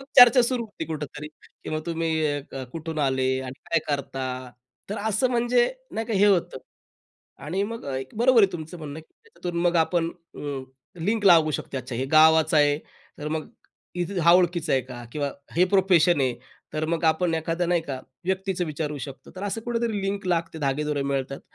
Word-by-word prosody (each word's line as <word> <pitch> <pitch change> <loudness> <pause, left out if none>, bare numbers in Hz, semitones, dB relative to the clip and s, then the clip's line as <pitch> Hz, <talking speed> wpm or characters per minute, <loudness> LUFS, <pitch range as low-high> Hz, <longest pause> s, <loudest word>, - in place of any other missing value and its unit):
मग 270 - -11
चर्चा 245 0 +9
सुरू 240 0 0
होते 210 - -7
कुठेतरी 150 -1 -6
किंवा 155 0 -8
मग - - -7
अ, - - -21
तुम्ही 160 -3 0 0.3
कुठून 160 -1 -5
आलात 130 -1 +1
आणि 130 +1 -8
काय 165 - +4
करता. 130 -3 -3 0.4
तर 210 - -2
असं 220 +4 +1
म्हणजे 240 0 +3 0.3
नाही 225 0 -3
का 230 - -3
हे 205 +1 +5
होतं. 180 -9 +2 0.9
आणि 185 +6 -1
मग 230 +3 -5
एक 130 0 -4
बरोबर 240 -2 +6
आहे 195 - +4
तुमचं 165 +1 -7
म्हणणं 150 0 -7
की 160 - -24
त्याच्यातून 175 - -5
मग 175 -1 +2
आपण 165 +1 +2
अ, 170 -1 -18 0.6
लिंक 210 +5 0
लावू 165 -4 +7
शकतो, 130 -3 -4
हे 130 +3 -1
गावाचं 155 +1 +5
आहे, 145 0 +4 0.4
तर 150 - -4
मग 155 0 -3 0.7
हा 170 +1 +7
ओळखीचा 175 -3 +3
आहे 135 - +4
का? 120 -2 -9
किंवा 145 -2 -1 0.3
हे 180 - +6
प्रोफेशन 180 -5 +4
आहे 130 -2 +1 0.4
तर 155 +1 -1
मग 165 +1 -1
आपण 165 +1 +2
एखाद्या 165 +2 -1
नाही 175 0 +2
का 135 -4 -5 0.3
व्यक्तीचं 190 0 -1
विचारू 150 -1 -3
शकतो, 135 0 -9
तर 185 - -6
असं 205 +2 -2
कुठेतरी 230 -3 -1
लिंक 195 0 -2
लागते, 165 -2 -1
धागेदोरे 145 0 -1
मिळतात 135 0 -2
160 Hz, 180 wpm, -25 LUFS, 145-190 Hz, 0.9 s, चर्चा